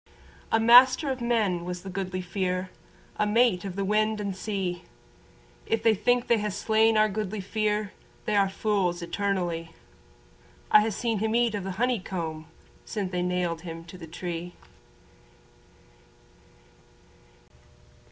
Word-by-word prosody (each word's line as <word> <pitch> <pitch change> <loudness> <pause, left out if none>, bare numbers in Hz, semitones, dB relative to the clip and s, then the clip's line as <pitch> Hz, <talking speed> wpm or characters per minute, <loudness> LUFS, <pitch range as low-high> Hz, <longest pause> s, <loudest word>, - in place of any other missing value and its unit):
A 225 - +4
master 255 +5 +6
of 260 -2 -4
men 215 -7 +1
was 180 0 -5
the 195 - -7
Goodly 185 -1 -3
Fere, 185 0 -2 0.5
A 210 - +1
mate 220 -3 +3
of 195 -3 -5
the 195 0 -1
wind 215 +1 +1
and 200 -2 -3
sea, 190 -3 -3 0.8
If 225 - 0
they 225 - +5
think 245 +4 +1
they 235 -2 +3
ha' 210 - -1
slain 220 +2 +2
our 215 0 +5
Goodly 210 0 -3
Fere 210 +1 -1 0.3
They 215 -3 0
are 200 -1 +3
fools 190 -4 -1
eternally. 175 -4 -2 1.0
I 210 - +8
ha' 220 +1 0
seen 225 0 -1
him 220 +2 0
eat 235 -2 +2
o' 205 - -1
the 190 -1 -5
honey 245 0 +1
comb 160 -4 -5 0.4
Sin' 200 -4 -4
they 180 -1 -1
nailed 180 -2 -1
him 165 -1 -7
to 170 +2 -11
the 165 - -9
tree. 175 +1 -6
200 Hz, 145 wpm, -27 LUFS, 180-220 Hz, 1.0 s, I